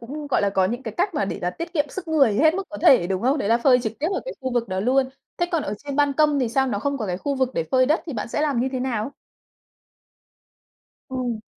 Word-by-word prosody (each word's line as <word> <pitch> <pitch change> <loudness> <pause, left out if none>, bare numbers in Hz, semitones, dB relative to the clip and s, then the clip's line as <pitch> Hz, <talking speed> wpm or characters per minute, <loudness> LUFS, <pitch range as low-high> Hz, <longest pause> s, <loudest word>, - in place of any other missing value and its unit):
cũng, 290 +6 -7
gọi 275 - +1
là, 200 - +2
có 190 -1 +2
những 240 +7 -2
cái 220 -4 -6
cách 375 0 0
mà 205 - +1
để 195 - -4
là 180 - 0
tiết 335 - -7
kiệm 295 -1 +1
sức 350 +4 -7
người 275 -9 +4
hết 315 +8 +4
mức 390 - -1
có 305 - -7
thể, 260 - +6
đúng 190 0 -2
không? 270 +5 +2
Đấy 205 - -1
là 230 - +4
phơi 250 0 +4
trực 220 -2 -2
tiếp 310 - 0
ở - - -1
cái - - -6
khu 260 -1 -3
vực 235 -3 0
đó 185 0 -2
luôn. 260 +4 +2 0.3
Thế 350 - 0
còn 330 -3 +1
ở 200 - -3
trên 280 -1 -4
ban 290 -1 +3
công 300 0 +3
thì 245 - +1
sao 265 +3 +1
nó 220 -6 -1
không 280 +5 -2
có 215 - -3
cái 180 - -2
khu 285 +5 -2
vực 260 -2 0
để 165 - 0
phơi 255 -1 +4
đất 310 +4 +2
thì 305 - -4
bạn 215 -1 -4
sẽ 265 - -2
làm 290 -5 +1
như 260 - +1
thế 255 - -2
nào? 250 0 -2 2.0
Ừ. 245 -4 -3
260 Hz, 290 wpm, -23 LUFS, 225-290 Hz, 2.0 s, thể